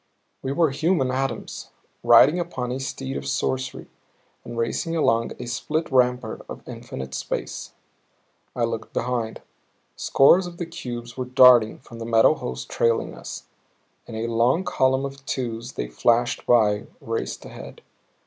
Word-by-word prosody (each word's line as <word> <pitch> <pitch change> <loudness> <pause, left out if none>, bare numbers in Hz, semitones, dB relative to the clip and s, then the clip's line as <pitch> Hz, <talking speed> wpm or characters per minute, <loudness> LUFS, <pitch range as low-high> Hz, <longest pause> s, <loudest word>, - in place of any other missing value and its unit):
We 135 - -3
were 160 0 +2
human 150 -2 +1
atoms, 130 -2 -3 0.3
riding 155 +6 +6
upon 130 -8 -3
a 130 - -3
steed 70 - -4
of 70 0 -6
sorcery 130 - -2 0.6
and 120 0 -8
racing 115 +8 -1
along 115 -7 +2
a - - -6
split 155 +7 -2
rampart 125 -3 +1
of - - -9
infinite 65 0 -7
space. - - -4 0.8
I 120 - 0
looked 115 -1 -3
behind 120 -2 -2 0.5
scores 175 +7 +4
of 175 -1 -10
the 175 - -3
cubes 120 -7 -7
were 130 - -2
darting 125 -3 +6
from 115 -3 -12
the 115 - -5
metal 115 -1 +5
host 65 0 -6
trailing 115 -1 +1
us; - - -8 0.6
in 115 - -8
a 110 +1 -2
long 115 +9 +2
column 130 -4 +1
of 140 0 -8
twos 120 -1 -3
they - - -3
flashed 120 - +1
by, 105 -4 +3
raced 115 0 -4
ahead. - - -10
125 Hz, 150 wpm, -24 LUFS, 115-135 Hz, 0.8 s, riding